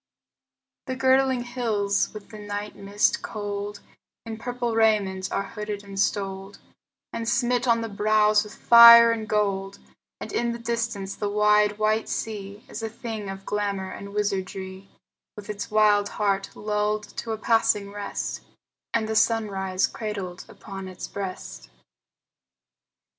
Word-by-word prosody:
The 260 Hz, -, -2 dB
girdling 260 Hz, -1 st, +3 dB
hills 220 Hz, -5 st, 0 dB
with 210 Hz, -2 st, -10 dB
the 215 Hz, -, -10 dB
night 205 Hz, 0 st, -5 dB
mist 200 Hz, +1 st, 0 dB
cold 205 Hz, -1 st, -5 dB, 0.4 s
In 225 Hz, -1 st, -6 dB
purple 245 Hz, 0 st, -3 dB
raiment 205 Hz, -4 st, +1 dB
are 195 Hz, -, 0 dB
hooded 210 Hz, -1 st, -5 dB
and 195 Hz, -1 st, -7 dB
stoled 195 Hz, -1 st, -2 dB, 0.6 s
And 230 Hz, 0 st, -2 dB
smit 245 Hz, 0 st, +1 dB
on 230 Hz, -1 st, +3 dB
the 225 Hz, -, -3 dB
brows 215 Hz, 0 st, +3 dB
with 210 Hz, 0 st, -11 dB
fire 235 Hz, 0 st, +9 dB
and 220 Hz, -1 st, -3 dB
gold; 195 Hz, -2 st, 0 dB, 0.4 s
And -, -, -7 dB
in 235 Hz, 0 st, 0 dB
the -, -, -5 dB
distance 230 Hz, -4 st, -3 dB
the 205 Hz, -, -3 dB
wide, 210 Hz, 0 st, +3 dB
white 215 Hz, +1 st, +1 dB
sea 205 Hz, -1 st, -5 dB
Is 220 Hz, -, -7 dB
a 225 Hz, -, -3 dB
thing 220 Hz, -3 st, -6 dB
of 195 Hz, 0 st, -8 dB
glamor 200 Hz, -2 st, -2 dB
and 200 Hz, +1 st, -8 dB
wizardry, 190 Hz, -1 st, -3 dB, 0.5 s
With 210 Hz, 0 st, -7 dB
its 205 Hz, +1 st, -6 dB
wild 210 Hz, -1 st, +3 dB
heart 195 Hz, -2 st, -1 dB
lulled 210 Hz, 0 st, -1 dB
to 230 Hz, -, -4 dB
a -, -, -3 dB
passing 210 Hz, -2 st, +1 dB
rest, 205 Hz, 0 st, -4 dB, 0.5 s
And 220 Hz, -1 st, +1 dB
the 220 Hz, -, -2 dB
sunrise 195 Hz, -5 st, +1 dB
cradled 195 Hz, -5 st, -5 dB
upon 195 Hz, -2 st, -9 dB
its 185 Hz, -1 st, -7 dB
breast. 190 Hz, -, -7 dB
210 Hz, 140 wpm, -25 LUFS, 200-225 Hz, 0.6 s, fire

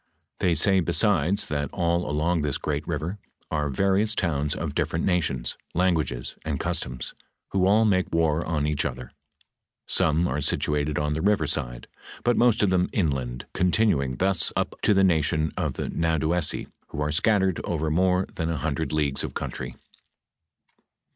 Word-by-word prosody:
They 85 Hz, -2 st, +2 dB
say 95 Hz, +1 st, +4 dB
besides, 90 Hz, 0 st, +2 dB
that 75 Hz, -1 st, -2 dB
all 85 Hz, -2 st, 0 dB
along 80 Hz, +3 st, +1 dB
this 75 Hz, -2 st, -1 dB
great 75 Hz, 0 st, -3 dB
river 85 Hz, +5 st, -3 dB, 0.3 s
are 75 Hz, -2 st, 0 dB
various 100 Hz, +8 st, +2 dB
towns 75 Hz, -5 st, 0 dB
of -, -, -4 dB
different 80 Hz, -, -1 dB
nations, 75 Hz, -10 st, 0 dB, 0.2 s
languages, 80 Hz, -9 st, 0 dB
and -, -, -2 dB
customs, 65 Hz, 0 st, -3 dB, 0.4 s
who 95 Hz, -1 st, +2 dB
all 110 Hz, +3 st, +4 dB
make 95 Hz, -3 st, +1 dB
war 80 Hz, -1 st, +2 dB
on 75 Hz, -3 st, -1 dB
each 75 Hz, -1 st, 0 dB
other; 65 Hz, -2 st, -5 dB, 0.7 s
some 85 Hz, -1 st, +2 dB
are 75 Hz, +3 st, -2 dB
situated 75 Hz, +1 st, 0 dB
on 75 Hz, 0 st, 0 dB
the 80 Hz, -, -2 dB
river 100 Hz, -4 st, +2 dB
side, -, -, -2 dB, 0.4 s
but 120 Hz, 0 st, +3 dB
most 120 Hz, -3 st, +3 dB
of 100 Hz, -, +3 dB
them 90 Hz, -1 st, +2 dB
inland, 65 Hz, -, -1 dB
continuing 90 Hz, -, +2 dB
thus 95 Hz, +6 st, +1 dB
up -, -, -1 dB
to 105 Hz, -, +3 dB
the 95 Hz, -, +4 dB
nation 80 Hz, -3 st, +2 dB
of -, -, -1 dB
the -, -, -4 dB
Nadouessi 80 Hz, 0 st, +1 dB, 0.2 s
who -, -, -7 dB
are 75 Hz, 0 st, 0 dB
scattered 95 Hz, +2 st, +2 dB
over 80 Hz, -2 st, -1 dB
more 90 Hz, +2 st, +2 dB
than 80 Hz, -1 st, -2 dB
a 80 Hz, -, -1 dB
hundred 80 Hz, +2 st, -2 dB
leagues 75 Hz, -3 st, 0 dB
of -, -, -5 dB
country." 60 Hz, -1 st, -5 dB
80 Hz, 160 wpm, -25 LUFS, 75-95 Hz, 0.7 s, say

